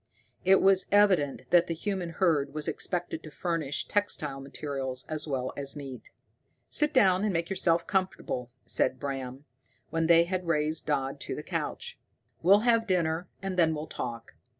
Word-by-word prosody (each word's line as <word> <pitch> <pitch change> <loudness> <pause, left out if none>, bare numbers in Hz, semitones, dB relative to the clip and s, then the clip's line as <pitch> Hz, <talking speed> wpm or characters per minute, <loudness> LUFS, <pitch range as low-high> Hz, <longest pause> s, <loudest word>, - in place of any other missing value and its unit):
It 190 +1 +5
was 195 -1 +4
evident 190 -9 +3
that 175 -1 +5
the 165 - -2
human 185 0 -3
herd 155 -5 +1
was 155 -1 0
expected 175 -2 -3
to 155 - -10
furnish 160 -3 -2
textile 155 -9 -1
materials 135 -2 -2
as 155 0 -3
well 130 -3 -2
as 140 0 -5
meat. 135 -4 -8 0.6
"Sit 300 0 +2
down, 195 -8 +4
and 210 - +1
make 170 +1 -2
yourself 170 -3 +2
comfortable," 185 -10 -2 0.2
said 130 0 0
Bram, 135 0 -5 0.5
when 165 0 +1
they 170 0 +7
had 180 0 -3
raised 155 -1 0
Dodd 140 -2 -1
to - - -4
the 150 - -6
couch. 480 - -4 0.4
"We'll 195 +5 +6
have 230 -1 +3
dinner, 170 -2 0 0.2
and 190 -1 -3
then 160 -2 +4
we'll 150 +1 -4
talk. 115 - -6
165 Hz, 165 wpm, -29 LUFS, 140-185 Hz, 0.6 s, they